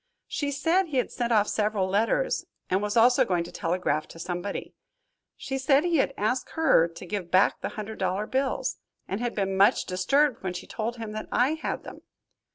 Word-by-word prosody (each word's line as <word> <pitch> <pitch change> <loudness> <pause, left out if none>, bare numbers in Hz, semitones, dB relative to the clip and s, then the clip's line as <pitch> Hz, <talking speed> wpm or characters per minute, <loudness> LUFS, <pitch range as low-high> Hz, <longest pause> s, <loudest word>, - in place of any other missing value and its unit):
She 285 - -2
said 325 +7 +1
he 290 -4 -3
had 250 - 0
sent 240 -1 -2
off 210 -2 +4
several 210 -3 0
letters 230 - +1 0.2
and 190 +2 +2
was 210 +2 -1
also 245 +2 +6
going 175 -2 0
to 170 - -9
telegraph 165 -3 -1
to - - -13
somebody. 175 +3 -4 0.6
She 270 0 -4
said 275 +2 +4
he 345 -2 +2
had 275 - +2
asked 250 +5 -1
her 320 - +4
to 170 +2 -11
give 180 -2 -4
back 185 +3 +3
the - - -2
hundred 215 +1 -6
dollar 190 +2 0
bills, 265 +3 -1 0.3
and 195 +4 -3
had 240 -1 -2
been 195 -2 -1
much 195 +2 +4
disturbed 250 +9 +2
when 185 -2 -3
she - - -6
told 230 +2 -4
him 225 -2 -6
that 215 0 -5
I 250 +4 +3
had 320 - -4
them. - - -10
215 Hz, 200 wpm, -27 LUFS, 190-265 Hz, 0.6 s, also